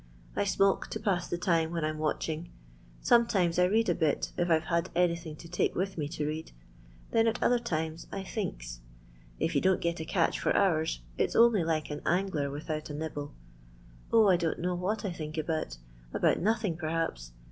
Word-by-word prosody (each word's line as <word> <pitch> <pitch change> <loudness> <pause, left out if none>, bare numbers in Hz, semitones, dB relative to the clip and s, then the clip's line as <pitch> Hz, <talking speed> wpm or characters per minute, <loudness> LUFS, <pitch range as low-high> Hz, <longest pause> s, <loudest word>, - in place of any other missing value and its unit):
I - - +1
smoke 195 0 +2
to - - -5
pass 180 -4 0
the 175 - -2
time 165 -2 +1
when 165 -2 -1
I - - +1
'm 155 0 -5
watching; 155 +2 -2 0.5
sometimes 195 -8 +3
I 180 - +6
read 220 +5 +2
a - - +3
bit 155 -4 0
if 175 0 0
I 165 - +6
're - - -4
had 170 +2 -1
anythini; 170 -3 0
to 165 - -11
take 175 +1 0
with 190 +2 -1
me 150 -3 -2
to 150 -1 -3
read; 155 +2 -4 0.6
thenal 225 0 +3
other 245 0 +3
times 160 -7 -3
I 195 - -4
thinks. - - -5 0.6
If - - 0
you - - +2
don't 190 -1 +3
get 170 -1 -1
a 165 +1 +1
for - - 0
hours, 160 - +2 0.2
it - - +3
's - - -6
only 230 -5 +5
like 160 -2 -1
an 150 - -4
angler 170 -5 0
without 155 +2 -4
a 145 - -5
nib 160 +1 -4
ble. 145 0 -5 0.8
0, 225 -1 +6
1 185 -3 +5
don't 165 -2 0
know 180 +1 -1
what 195 +5 -2
I 195 - -1
think 155 -2 -6
about; 155 - -2 0.4
about - - +3
nothing, 210 -4 0
perhaps. 155 - -3
170 Hz, 200 wpm, -30 LUFS, 155-190 Hz, 0.8 s, I